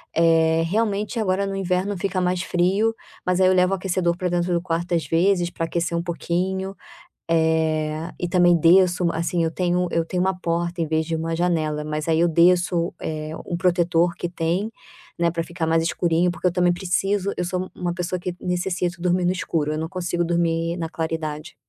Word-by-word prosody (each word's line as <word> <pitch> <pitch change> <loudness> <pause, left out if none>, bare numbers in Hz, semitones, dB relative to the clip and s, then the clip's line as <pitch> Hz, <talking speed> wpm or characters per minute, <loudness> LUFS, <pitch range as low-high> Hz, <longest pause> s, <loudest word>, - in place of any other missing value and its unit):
eh, 165 0 +4
realmente 210 +4 -1
agora 200 -2 +1
no 195 0 -3
inverno 190 +1 -1
fica 190 0 -1
mais 180 0 0
frio, 190 +5 +1 0.3
mas 180 0 +1
aí 185 - +5
eu 185 - +4
levo 180 0 +3
o - - +2
aquecedor 185 -2 0
para 180 0 -1
dentro 175 0 0
do 170 - +1
quarto 175 0 -2
às 165 -3 +1
vezes, 175 +3 +2
para 165 - -3
aquecer 170 0 -1
um 170 - -1
pouquinho. 185 +3 -2 0.6
Eh, 160 0 +1
e 175 - -2
também 175 -1 +4
desço 180 +2 +4
u 170 - +1
assim, 170 +1 0
eu 165 - 0
tenho 180 +1 0
eu 165 - +1
tenho 180 +2 -2
uma 190 0 0
porta 170 0 -2
em - - 0
vez 160 0 0
de 165 - -2
uma 165 +1 -2
janela, 155 -3 0
mas 155 +1 -3
aí 160 0 +3
eu 170 - +4
desço, 175 +1 +3
eh, 155 0 -4
um 175 - -2
protetor 175 -1 +2
que 175 - -4
tem, 175 +5 -1 0.5
né, 170 0 +2
para 165 0 -2
ficar 170 -1 -3
mais 165 0 +2
escurinho, 170 +1 +1
porque 180 - -3
eu - - -3
também 180 -1 +3
preciso, 195 +2 0
eu - - -1
sou 185 +1 -3
uma 175 -1 -3
pessoa 180 +1 -2
que 180 0 -4
necessito 180 -1 -2
dormir 180 0 +1
no 180 - +3
escuro, 160 -4 -1
eu 155 - -2
não 160 +1 -3
consigo 175 -1 -2
dormir 170 0 0
na 165 -1 -3
claridade. 160 -1 -4
175 Hz, 205 wpm, -23 LUFS, 165-180 Hz, 0.6 s, aí